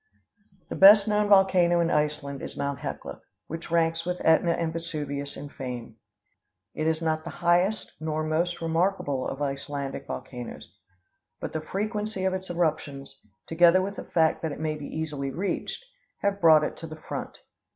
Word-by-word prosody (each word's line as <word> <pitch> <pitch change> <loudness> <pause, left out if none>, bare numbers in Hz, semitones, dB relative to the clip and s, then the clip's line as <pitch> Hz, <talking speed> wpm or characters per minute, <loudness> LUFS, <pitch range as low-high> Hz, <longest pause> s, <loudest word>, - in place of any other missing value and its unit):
The - - -4
best 200 +2 +8
known 210 -1 +2
volcano 185 -3 +5
in 170 0 +2
Iceland 150 -2 -1
is - - -7
Mt. 140 -2 -2
Hecla, - - -6 0.2
which 165 +2 -7
ranks 165 0 +1
with 180 +1 -2
Ætna 165 +1 +3
and 165 -1 -1
Vesuvius 145 -4 -4
in 145 - -7
fame. 125 -5 -7 0.8
It 155 - -2
is 160 +1 0
not 155 -1 0
the 170 - -6
highest 175 +5 +1
nor 155 0 -2
most 165 +2 -1
remarkable 165 -5 0
of 140 +2 -4
Icelandic 140 0 -4
volcanoes; 125 -2 -7 0.6
but - - -5
the 160 - -2
frequency 210 +3 -3
of 190 - +1
its 190 0 -5
eruptions, 155 -5 -2 0.2
together 175 +3 +5
with 200 +1 -4
the - - -6
fact 160 -2 +1
that 160 - -2
it - - -7
may 155 -1 -1
be 150 -2 -7
easily 150 -3 -3
reached, 190 - -3 0.4
have 200 0 0
brought 160 -2 +7
it - - -2
to 165 - -8
the 155 0 -9
front. - - -6
160 Hz, 170 wpm, -27 LUFS, 150-180 Hz, 0.8 s, best